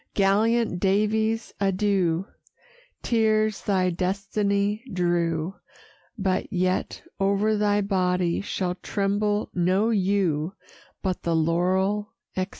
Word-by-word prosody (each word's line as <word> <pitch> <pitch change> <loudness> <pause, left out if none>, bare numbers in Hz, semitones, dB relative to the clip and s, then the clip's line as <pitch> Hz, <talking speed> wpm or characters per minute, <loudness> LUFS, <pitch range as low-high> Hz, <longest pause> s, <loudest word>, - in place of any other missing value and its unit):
Gallant 215 +1 +2
Daviess, 220 +3 +1
adieu! 195 -3 +1 0.8
Tears 215 -2 +2
thy 185 -3 +1
destiny 200 +3 -1
drew; 175 -1 0 0.6
But 190 -2 -1
yet 185 0 -1 0.2
o'er 200 +2 +2
thy 205 0 +2
body 180 -3 0
shall 185 -2 -2
tremble 205 +3 -1
no 190 +5 +2
yew, 190 -4 +1 0.5
For 190 -2 +1
the 170 -1 0
laurel, 190 +6 +1 0.2
etc. 185 +1 -1
195 Hz, 95 wpm, -25 LUFS, 180-210 Hz, 0.8 s, Gallant